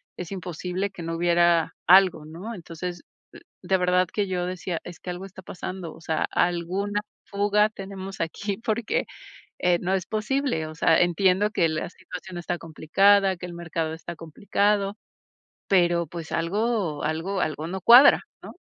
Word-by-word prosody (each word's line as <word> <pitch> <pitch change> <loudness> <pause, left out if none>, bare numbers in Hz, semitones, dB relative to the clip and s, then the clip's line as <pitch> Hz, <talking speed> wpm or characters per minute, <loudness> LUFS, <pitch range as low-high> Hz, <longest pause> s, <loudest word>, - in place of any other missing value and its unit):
Es 180 0 -7
imposible 185 +1 -4
que 190 - -10
no 165 0 -3
hubiera 170 -1 +3
algo, 185 -3 +6
¿no? 170 +9 -8
Entonces, 175 -1 -7 0.6
de 190 - +2
verdad 180 0 +2
que 205 -2 0
yo 180 -1 -1
decía: 180 -1 -4
"Es 175 -3 -10
que - - -7
algo 180 +2 -5
está 190 -1 -11
pasando, 180 -1 -7
o 160 - -16
sea, 160 -1 -1
alguna 185 +4 0 0.2
fuga 205 +1 +2
tenemos 195 -2 -7
aquí 195 +5 -3
porque, 230 0 -1 0.5
eh, 175 -1 +2
no 185 +1 -1
es 185 -1 -1
posible". 220 - -1
O 155 - -8
sea, 165 0 +3
entiendo 185 +3 +2
que 170 -5 +2
la 155 0 -3
situación 185 -1 -9
está 175 0 -3
complicada, 190 +5 +3
que 180 - -10
el 175 - -8
mercado 165 -2 -3
está 170 +1 -8
complicado, 200 +5 0 0.7
pero, 175 -3 +3
pues, 165 +1 -8
algo 195 -1 -1
algo 165 +6 -2
algo 155 -2 -2
no 190 +2 -4
cuadra, 250 +7 +8 0.2
¿no? - - -11
180 Hz, 160 wpm, -25 LUFS, 170-200 Hz, 0.7 s, cuadra